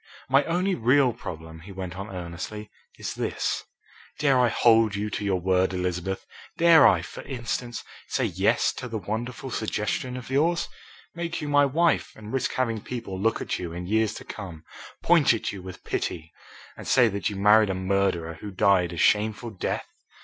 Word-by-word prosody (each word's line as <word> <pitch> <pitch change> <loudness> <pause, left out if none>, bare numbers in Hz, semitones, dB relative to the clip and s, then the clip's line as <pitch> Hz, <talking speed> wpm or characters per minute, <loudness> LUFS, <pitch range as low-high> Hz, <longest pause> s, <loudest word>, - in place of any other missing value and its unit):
"My 135 +2 +5
only 180 +3 +1
real 125 -1 +3
problem," 80 -3 -8
he 95 +5 -11
went 95 -2 -6
on 100 +3 -6
earnestly, 95 +4 -6 0.3
"is - - -4
this. - - -2 0.5
Dare 140 -3 +3
I 125 -1 +4
hold 115 -2 +4
you 105 +1 -2
to - - -3
your 95 -2 +1
word, 95 +1 +2
Elizabeth? 90 +1 -2 0.3
Dare 165 -2 +7
I, - - +3
for - - -8
instance, 120 -2 -4 0.2
say - - 0
'yes' - - +2
to 125 - -5
the 115 -2 -4
wonderful 120 +6 -4
suggestion 110 +3 -2
of 125 +1 -8
yours? 165 +5 +2 0.5
make 170 0 -4
you 150 - -4
my 145 0 +5
wife 165 +5 +1
and 110 +1 -10
risk 135 -2 0
having 115 -4 -1
people 115 -7 -5
look 115 +2 +1
at - - -2
you 85 -2 -5
in 90 +1 -5
years 110 +2 +1
to - - -9
come, 90 -6 -8 0.4
point 165 -8 +5
at 110 - -3
you 100 - -8
with 95 0 -10
pity 80 -2 -3 0.4
and - - -9
say 125 -3 +5
that 100 -2 -1
you 105 - -6
married 105 +2 +5
a 95 - -1
murderer 95 -4 0
who 105 - -6
died 95 -2 +2
a - - -7
shameful 110 +5 +2
death! 95 - -3
105 Hz, 185 wpm, -26 LUFS, 95-125 Hz, 0.5 s, Dare